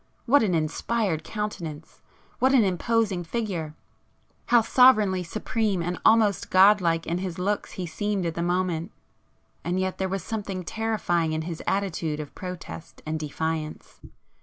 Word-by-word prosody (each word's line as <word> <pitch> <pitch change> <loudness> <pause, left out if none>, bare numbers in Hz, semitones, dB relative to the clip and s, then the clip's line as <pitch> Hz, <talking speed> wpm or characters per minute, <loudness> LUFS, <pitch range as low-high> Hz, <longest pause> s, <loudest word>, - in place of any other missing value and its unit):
What 285 +4 +5
an 195 -6 +1
inspired 165 +3 -1
countenance!—what 210 - -3
an 245 - +6
imposing 200 0 0
figure!—how 195 +4 -3
sovereignly 215 -6 +5
supreme 205 +1 -1
and 175 +1 -3
almost 220 -3 +4
god 195 +2 +6
like 165 -1 +1
in 170 +2 -1
his 185 -3 -4
looks 200 +3 -2
he 185 - -4
seemed 200 +3 -2
at 165 - -1
the 170 - -3
moment;—and 175 -3 -4
yet 185 0 -2
there 190 0 0
was 195 -2 -3
something 200 -4 -4
terrifying 175 -6 -1
in 155 0 -2
his 165 -1 -5
attitude 165 -6 -1
of 150 -2 -7
protest 180 -2 -8
and 155 0 -2
defiance. 155 +1 -4
185 Hz, 135 wpm, -26 LUFS, 165-210 Hz, -, an